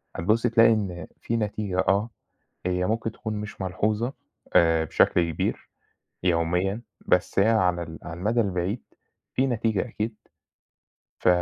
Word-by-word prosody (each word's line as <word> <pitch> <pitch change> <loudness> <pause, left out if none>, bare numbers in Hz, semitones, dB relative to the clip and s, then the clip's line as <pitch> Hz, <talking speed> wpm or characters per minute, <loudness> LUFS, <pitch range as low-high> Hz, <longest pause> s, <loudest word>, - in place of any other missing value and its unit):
هتبُصي 110 +8 +2
تلاقي 115 0 +6
إن، 90 -6 -3
في 115 - -1
نتيجة 105 -3 -2
آه، 100 +4 +2 0.6
هي 90 0 +1
ممكن 115 0 -1
تكون 110 -2 -5
مش 105 -1 -6
ملحوظة، 105 +6 0 0.4
آآ 80 -1 +5
بشكل 85 +2 +2
كبير، - - -3 0.5
يوميًا، 90 +5 +1 0.3
بس 90 - +2
هي 105 +3 +5
على 90 -6 +2
ال 80 -1 -9
على - - -7
المدى 115 +5 +2
البعيد، 95 +3 -2 0.5
في 130 +1 +3
نتيجة 110 -4 +1
أكيد، 110 0 -3 1.0
ف - - +1
100 Hz, 135 wpm, -26 LUFS, 90-115 Hz, 1.0 s, تلاقي